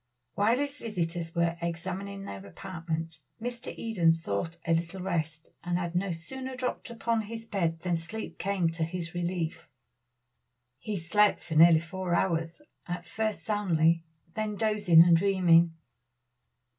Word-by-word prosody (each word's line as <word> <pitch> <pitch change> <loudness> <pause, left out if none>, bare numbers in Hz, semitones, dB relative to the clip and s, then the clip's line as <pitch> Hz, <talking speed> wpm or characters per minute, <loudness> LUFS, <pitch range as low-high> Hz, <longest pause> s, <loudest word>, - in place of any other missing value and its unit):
While 220 +4 +3
his 285 +1 -3
visitors 170 -6 -2
were 170 0 +1
examining 190 +4 -4
their 100 - -7
apartments, 165 - -5 0.2
Mr. 240 +1 -5
Eden 190 -8 +3
sought 165 +1 -2
a 165 - +2
little 170 +3 -1
rest, 160 -4 -2
and 175 0 0
had 175 -1 -3
no 180 +2 0
sooner 260 +11 -6
dropped 255 0 -3
upon 230 -1 0
his 225 +1 -7
bed 170 -6 -1
than 175 -2 0
sleep 210 +7 -7
came 190 -4 +1
to 165 0 -2
his 165 0 -4
relief. 175 -2 -3 1.1
He 215 -2 -3
slept 205 +5 +3
for 165 - -6
nearly 160 0 +7
four 180 +1 -2
hours; 170 - 0 0.2
at 175 0 -4
first 220 -1 -2
soundly, 170 -6 +2 0.3
then 215 -1 -2
dozing 205 -6 +6
and 170 -1 +6
dreaming. 170 -3 +4
175 Hz, 145 wpm, -29 LUFS, 165-205 Hz, 1.1 s, nearly